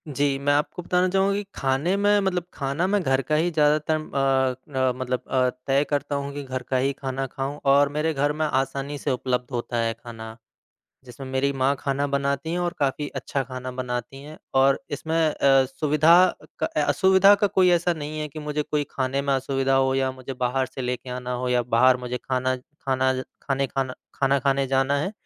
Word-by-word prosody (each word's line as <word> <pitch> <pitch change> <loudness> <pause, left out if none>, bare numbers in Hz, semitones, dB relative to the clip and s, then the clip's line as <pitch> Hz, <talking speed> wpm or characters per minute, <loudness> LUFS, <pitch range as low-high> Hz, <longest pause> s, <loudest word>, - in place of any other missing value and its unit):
जी, 140 0 +1
मैं 145 +1 +2
आपको 150 +4 -1
बताना 180 +1 +1
चाहूँगा 195 +1 +2
कि 205 - -2
खाने 135 +7 0
में 205 0 +3
मतलब 185 -3 0
खाना 140 +5 -1
मैं 205 +1 +1
घर 135 -2 +2
का 155 - +3
ही 165 +3 +2
ज़्यादातर 150 0 +2
अ 135 -2 -1
अ, 130 -1 +3
मतलब 125 -1 -2
अ, 130 -1 +2 0.2
तय 135 +1 +3
करता 145 0 -1
हूँ 140 0 -3
कि 145 0 -5
घर 130 -1 -5
का 130 - +1
ही 135 +2 +1
खाना 135 0 -4
खाऊँ। 135 +2 -5
और 140 +1 +5
मेरे 155 +2 0
घर 145 +1 +1
में 155 +1 -1
आसानी 135 0 -2
से 140 - -2
उपलब्ध 125 0 -2
होता 120 -1 -3
है 115 -1 0
खाना, 115 -1 -10 0.7
जिसमें 130 +2 -9
मेरी 135 +1 +1
माँ 135 +1 +1
खाना 140 +1 -1
बनाती 140 +2 -1
हैं 175 - -1
और 175 0 -1
काफ़ी 145 +1 0
अच्छा 135 - -2
खाना 130 -1 -6
बनाती 125 +1 -5
हैं। 155 +2 -11 0.2
और 135 +1 +4
इसमें 160 +2 -3
अ, 135 -2 +4
सुविधा 155 +6 +4 0.3
क - - +1 0.2
असुविधा 190 +7 +5
का 205 0 +2
कोई 185 -2 +3
ऐसा 175 0 +2
नहीं 155 -1 -6
है 150 - -3
कि 150 +1 -9
मुझे 150 0 -2
कोई 150 0 -1
खाने 135 +1 -1
में 140 0 0
असुविधा 135 0 0
हो 135 0 +3
या 135 -1 +1
मुझे 130 +1 -8
बाहर 130 +1 +1
से 130 - -8
लेके 125 0 -4
आना 125 0 -5
हो 125 - -1
या 125 0 +2
बाहर 130 +2 +5
मुझे 125 0 -4
खाना 130 0 0 0.3
खाना 130 -1 +1 0.3
खाने 135 -1 0
खाना 130 -1 -2 0.2
खाना 140 0 +2
खाने 135 +1 +1
जाना 135 +2 +2
है। 170 +7 -2
135 Hz, 205 wpm, -24 LUFS, 130-150 Hz, 0.7 s, और